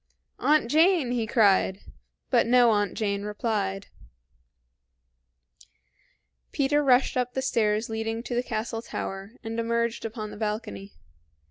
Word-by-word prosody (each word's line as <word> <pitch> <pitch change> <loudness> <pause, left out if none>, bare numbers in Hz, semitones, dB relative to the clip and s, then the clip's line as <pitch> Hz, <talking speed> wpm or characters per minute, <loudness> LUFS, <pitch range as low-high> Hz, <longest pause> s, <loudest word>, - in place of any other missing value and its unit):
"Aunt 300 -5 +3
Jane!" 320 -4 +4
he 235 -3 -1
cried; 200 -4 +3 0.5
but - - +3
no 245 -1 +5
Aunt 205 -3 0
Jane 200 -2 -1
replied. 205 -2 -2 2.7
Peter 290 +1 +1
rushed 260 -1 +3
up 250 0 -1
the 265 - 0
stairs 215 -3 +1
leading 225 +1 -3
to 245 - -5
the 240 - +1
castle 225 -1 -4
tower, 195 -2 -6
and 225 +1 -4
emerged 235 0 -1
upon 215 -2 -5
the - - -9
balcony. 210 -2 -4
225 Hz, 125 wpm, -26 LUFS, 210-245 Hz, 2.7 s, no